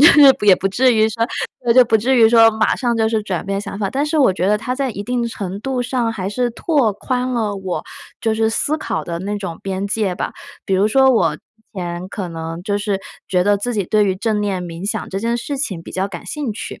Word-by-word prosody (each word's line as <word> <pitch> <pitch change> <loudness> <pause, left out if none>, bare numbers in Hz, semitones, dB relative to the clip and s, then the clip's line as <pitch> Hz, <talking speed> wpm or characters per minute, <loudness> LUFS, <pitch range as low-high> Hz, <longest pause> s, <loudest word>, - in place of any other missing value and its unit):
就 295 - +9
是 300 - +7 0.2
也 205 -2 +7
不 - - -2
至 250 +6 +3
于 220 0 +4
说 230 +1 -1 0.4
对， 235 - +4
就 255 - +8
不 225 -1 +3
至 250 +5 +1
于 225 -2 +7
说 225 -1 +7
马 220 0 +1
上 240 -3 -1
就 220 -1 +2
是 220 -1 0
转 190 -5 -3
变 195 0 -1
想 200 - -7
法。 200 -2 -1
但 280 +2 0
是 310 +1 0
我 260 -9 +5
觉 185 +1 -1
得 210 - +3
它 250 +4 -3
在 270 -1 -1
一 200 -2 -5
定 245 +1 -1
程 200 -3 -5
度 260 +1 -2
上 245 -2 -1
还 190 -3 -4
是 245 +4 -1
拓 260 -2 +1
宽 250 +5 -2
了 220 -4 -1
我 190 -2 -4 0.4
就 225 -1 +1
是 220 0 +1
思 290 +7 0
考 - - -3
的 170 -1 -4
那 205 +3 -3
种 180 -5 -6
边 195 0 -3
界 200 -2 -1
吧。 - - -4 0.3
比 195 - 0
如 200 +3 +3
说， 265 +3 +5
我 170 -11 +2
之 - - -24 0.3
前 175 0 -5
可 190 -1 -5
能 165 0 -6
就 205 +1 -1
是 205 -1 -1 0.3
觉 180 -1 +2
得 205 +1 +3
自 235 +4 -3
己 205 - 0
对 210 +3 +2
于 190 -2 0
正 215 +1 0
念 195 -3 -2
冥 170 +3 -6
想 220 - -4
这 195 - -3
件 235 +2 0
事 280 +4 -4
情 195 - -3
比 - - -10
较 190 +1 -1
感 175 -3 -9
兴 290 -7 -3
趣， 210 - -7
215 Hz, 280 characters per minute, -19 LUFS, 195-240 Hz, 0.4 s, 就